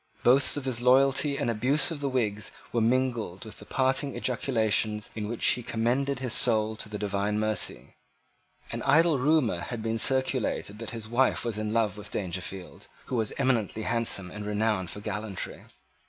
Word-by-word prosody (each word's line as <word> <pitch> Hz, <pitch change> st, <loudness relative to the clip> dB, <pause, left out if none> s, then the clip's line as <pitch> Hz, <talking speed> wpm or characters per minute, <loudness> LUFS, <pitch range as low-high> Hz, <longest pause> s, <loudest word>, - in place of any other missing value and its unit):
Boasts 135 Hz, +4 st, +5 dB
of 140 Hz, -, -4 dB
his 125 Hz, -3 st, 0 dB
loyalty 135 Hz, +3 st, +3 dB
and -, -, -1 dB
abuse 125 Hz, +8 st, +2 dB
of 160 Hz, -, -5 dB
the 140 Hz, -1 st, -2 dB
Whigs 105 Hz, -5 st, -1 dB, 0.2 s
were 120 Hz, -, +1 dB
mingled 120 Hz, -4 st, 0 dB
with 110 Hz, -, -10 dB
the 105 Hz, -, -13 dB
parting 135 Hz, +1 st, 0 dB
ejaculations 110 Hz, -4 st, 0 dB
in 105 Hz, -2 st, -4 dB
which 115 Hz, +1 st, -3 dB
he 125 Hz, -, +1 dB
commended 125 Hz, +4 st, -1 dB
his 125 Hz, -2 st, -2 dB
soul 110 Hz, -4 st, +3 dB
to 110 Hz, -, -5 dB
the 105 Hz, -, -5 dB
divine 105 Hz, +1 st, -1 dB
mercy. 110 Hz, -, -2 dB, 0.8 s
An -, -, -4 dB
idle 155 Hz, +1 st, +4 dB
rumour 135 Hz, -, +2 dB
had 115 Hz, +4 st, -6 dB
been 115 Hz, 0 st, -1 dB
circulated 130 Hz, -5 st, +1 dB
that 115 Hz, -2 st, -5 dB
his 115 Hz, -2 st, -7 dB
wife 125 Hz, +3 st, +1 dB
was 110 Hz, -3 st, -2 dB
in 105 Hz, 0 st, -3 dB
love 110 Hz, -3 st, 0 dB
with 105 Hz, -, -7 dB
Dangerfield, 95 Hz, 0 st, -6 dB, 0.2 s
who -, -, -4 dB
was 110 Hz, -3 st, 0 dB
eminently 115 Hz, -5 st, 0 dB
handsome 110 Hz, -6 st, +2 dB
and 105 Hz, 0 st, -7 dB
renowned 105 Hz, -3 st, -1 dB
for 105 Hz, -, -7 dB
gallantry. 105 Hz, -2 st, -5 dB
115 Hz, 175 wpm, -27 LUFS, 105-130 Hz, 0.8 s, Boasts